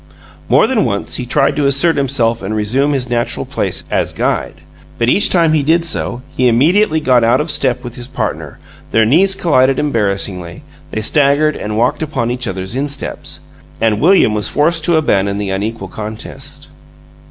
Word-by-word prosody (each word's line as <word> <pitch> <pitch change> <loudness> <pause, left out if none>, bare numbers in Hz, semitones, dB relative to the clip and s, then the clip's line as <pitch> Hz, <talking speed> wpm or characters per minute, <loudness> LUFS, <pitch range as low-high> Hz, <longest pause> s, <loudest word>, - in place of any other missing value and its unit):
More - - +5
than 240 -5 +1
once 100 0 -2
he 125 - -5
tried 140 +2 +1
to 145 -2 +2
assert 140 +5 +3
himself 120 -4 0
and 100 +3 -3
resume 130 +8 +1
his 130 -2 -1
natural 120 -1 -1
place - - -2
as - - 0
guide, - - -2 0.4
but 115 0 +1
each 205 - +3
time 165 -3 +3
he 155 - +2
did 165 +4 +2
so 125 -6 -3
he 125 - +2
immediately 160 - +3
got 130 -5 +3
out 115 +1 +3
of 150 +1 -1
step 135 -4 0
with 120 - -7
his 120 0 -5
partner, - - -4 0.3
their 110 0 +3
knees 185 - +3
collided 135 -5 +2
embarrassingly, 100 - -2 0.3
they 110 - -3
staggered 145 +3 +2
and 105 0 -4
walked 145 +7 +1
upon 140 -6 -2
each 125 0 -3
other's 95 +3 -4
insteps 140 +1 -4 0.4
and 110 -1 +1
William 175 - +4
was 105 -1 0
forced 165 +2 +1
to 170 - +2
abandon 100 -10 +1
the 100 -2 -3
unequal 100 +1 -3
contest. 110 +3 -6
130 Hz, 175 wpm, -15 LUFS, 110-150 Hz, 0.4 s, More